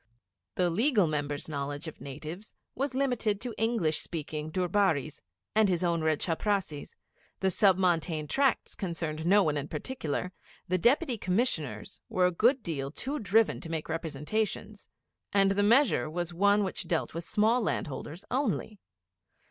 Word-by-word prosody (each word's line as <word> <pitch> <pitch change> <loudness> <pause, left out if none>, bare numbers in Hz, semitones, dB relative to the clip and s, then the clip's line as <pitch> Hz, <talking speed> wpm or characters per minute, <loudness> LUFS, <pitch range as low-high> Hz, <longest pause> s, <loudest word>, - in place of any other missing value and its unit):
The 175 -1 +2
Legal 220 - +3
Member's 145 -2 -2
knowledge 145 +1 -4
of 160 - -9
natives 155 +9 -8 0.2
was 270 0 -2
limited 245 -6 +1
to 245 -2 -4
English 225 -9 +1
speaking 155 -1 -4
Durbaris, 180 -5 +1 0.3
and 215 -2 +4
his 180 -1 +1
own 170 -2 +1
red 155 -1 +2
chaprassis, 180 -3 -2 0.4
the 190 0 +1
Sub 190 0 +4
Montane 165 -4 +1
Tracts 270 - +1
concerned 165 -4 -3
no 200 +2 +6
one 150 -3 0
in 145 0 -3
particular, 170 - -3 0.4
the 185 +1 +1
Deputy 250 - +2
Commissioners 185 - -1
were 185 -1 +2
a 180 - +3
good 240 +8 +3
deal 140 -5 -3
too 275 - -3
driven 200 - +2
to 165 - -7
make 160 -1 -3
representations, 180 +7 -3 0.5
and 195 -1 +4
the 200 +1 +2
measure 225 - +4
was 175 +1 -3
one 200 +3 +4
which 190 -2 -4
dealt 165 -2 -1
with 165 +1 -4
small 220 +6 +2
land 210 - -1
holders 155 +3 -7
only. 240 -5 -1
180 Hz, 155 wpm, -29 LUFS, 155-215 Hz, 0.5 s, no